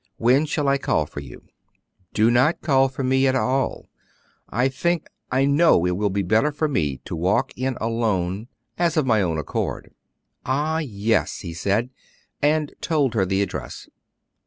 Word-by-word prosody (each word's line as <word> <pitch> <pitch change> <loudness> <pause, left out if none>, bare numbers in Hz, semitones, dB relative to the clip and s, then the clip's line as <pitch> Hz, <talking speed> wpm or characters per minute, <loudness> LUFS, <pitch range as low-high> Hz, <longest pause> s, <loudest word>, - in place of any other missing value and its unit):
When 130 +6 +3
shall 150 -2 -1
I 140 0 +2
call 80 - +1
for 75 - -8
you?" 65 -4 -11 0.7
"Do 110 +2 +4
not 130 +7 +3
call 135 -3 +3
for 135 +1 -5
me 130 +1 +3
at 130 - +2
all; 130 +1 -1 0.6
I 125 +4 +1
think 165 +5 -1 0.2
I 130 +2 +3
know 140 - +4
it 90 - +1
will 105 +2 0
be 100 +1 -1
better 110 +11 +2
for 155 +2 -1
me 75 - -1
to - - -5
walk 90 +5 0
in 130 0 -2
alone, 110 -3 -1 0.3
as 170 -2 +1
of 155 - +3
my 110 -4 +3
own 85 -4 0
accord." 75 - -4 0.5
"Ah, 150 +5 0
yes!" 110 -6 -1
he 85 -4 -6
said, 100 +8 -1 0.5
and 150 0 +1
told 145 -7 +1
her 95 -5 +1
the 95 +1 +1
address. - - -6
125 Hz, 170 wpm, -23 LUFS, 100-140 Hz, 0.7 s, Do